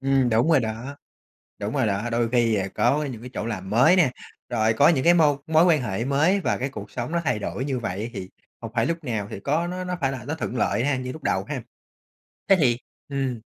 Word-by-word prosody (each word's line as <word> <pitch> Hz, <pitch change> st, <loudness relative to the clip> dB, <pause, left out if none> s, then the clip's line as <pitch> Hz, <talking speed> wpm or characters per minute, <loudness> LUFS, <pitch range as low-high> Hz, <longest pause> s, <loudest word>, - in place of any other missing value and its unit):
Ừm, 135 Hz, -2 st, +2 dB
đúng 115 Hz, +7 st, +2 dB
rồi 155 Hz, -4 st, +5 dB
đó, 115 Hz, +5 st, -5 dB, 0.6 s
đúng 105 Hz, +2 st, -4 dB
rồi 130 Hz, -5 st, +2 dB
đó. 105 Hz, +3 st, -1 dB
Đôi 115 Hz, 0 st, +1 dB
khi, 120 Hz, -2 st, +3 dB
à, 95 Hz, -2 st, -1 dB
có 150 Hz, +2 st, +2 dB
những 125 Hz, -6 st, -6 dB
cái 125 Hz, -, -9 dB
chỗ 110 Hz, -, -3 dB
làm 95 Hz, -4 st, -5 dB
mới 120 Hz, -, +5 dB
nè, 165 Hz, -8 st, +4 dB, 0.4 s
rồi 110 Hz, -2 st, +2 dB
có 140 Hz, +6 st, +5 dB
những 150 Hz, -6 st, +2 dB
cái 175 Hz, +1 st, +6 dB
môi 150 Hz, -4 st, +4 dB
mối 160 Hz, +1 st, +4 dB
quan 160 Hz, -6 st, +4 dB
hệ 110 Hz, 0 st, -2 dB
mới 150 Hz, +9 st, +2 dB
và -, -, 0 dB
cái 130 Hz, -, -2 dB
cuộc 105 Hz, -6 st, -9 dB
sống 125 Hz, +5 st, -4 dB
nó 170 Hz, -, +1 dB
thay 125 Hz, -6 st, +1 dB
đổi 125 Hz, +4 st, -4 dB
như 135 Hz, -3 st, -1 dB
vậy, 110 Hz, +1 st, -4 dB
thì 95 Hz, -3 st, -6 dB, 0.3 s
không 115 Hz, -1 st, -7 dB
phải 115 Hz, 0 st, +2 dB
lúc 165 Hz, +1 st, -3 dB
nào 110 Hz, -6 st, -2 dB
thì -, -, -6 dB
có 155 Hz, +9 st, 0 dB
nó 180 Hz, +1 st, -4 dB
nó 185 Hz, -, -4 dB
nó 180 Hz, 0 st, -3 dB
phải 135 Hz, -2 st, +1 dB
là 125 Hz, -4 st, -6 dB
nó 145 Hz, +4 st, -3 dB
thuận 140 Hz, -5 st, -4 dB
lợi 115 Hz, +2 st, +1 dB
ha, 145 Hz, -1 st, +1 dB
như 130 Hz, 0 st, -4 dB
lúc 155 Hz, -, -10 dB
đầu -, -, 0 dB
ha. -, -, -4 dB, 0.9 s
Thế 195 Hz, -, +8 dB
thì 130 Hz, -9 st, +3 dB, 0.3 s
ừm, 135 Hz, -4 st, -2 dB
130 Hz, 255 wpm, -24 LUFS, 115-150 Hz, 0.9 s, Thế